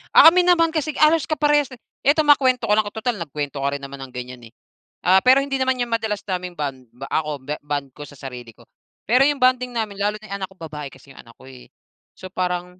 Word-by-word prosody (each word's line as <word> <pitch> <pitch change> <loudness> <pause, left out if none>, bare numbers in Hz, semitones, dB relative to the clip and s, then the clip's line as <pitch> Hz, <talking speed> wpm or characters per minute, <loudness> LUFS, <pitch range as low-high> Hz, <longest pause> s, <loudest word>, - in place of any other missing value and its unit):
Ah, - - +11
kami 365 +1 +4
naman 335 -2 +4
kasi 310 -1 -1
halos 305 +1 +4
kaparehas, 295 -2 +2
eh. - - -24 0.3
Ito 310 +2 +4
makwento 260 -4 +4
ko - - +5
lang 215 - +2
total 220 0 -3
nagkwento 145 -3 -5
ka 140 - +1
rin 140 - -8
naman 140 0 -8
ng 130 -1 -12
ganyan, 125 0 -8
eh. - - -35 0.5
Ah, 190 +1 +5
pero 260 +2 +6
hindi 275 -1 -2
naman 260 0 +1
yan 240 -1 -2
madalas 220 -2 -1
naming 180 -2 -4
bond 130 -4 -5 0.2
ako 155 -1 -1
ba 150 - -3
bond 145 -1 -4
ko - - -12
sa 145 - -15
sarili 125 -3 -8
ko, - - -20 0.4
pero 245 +5 +3
yung 290 - -1
bonding 255 0 +3
namin 220 -3 -2
lalo 205 +1 0
na 215 - -14
yung 200 - -2
anak 190 - -4
ko, - - -18
babae 150 -3 -7
kasi 135 +1 -17
yung - - -13
anak 115 -1 -18
ko, - - -15
eh. 130 -1 -14 0.5
So 185 - -9
parang 180 0 -3
190 Hz, 240 wpm, -21 LUFS, -, 0.5 s, Ah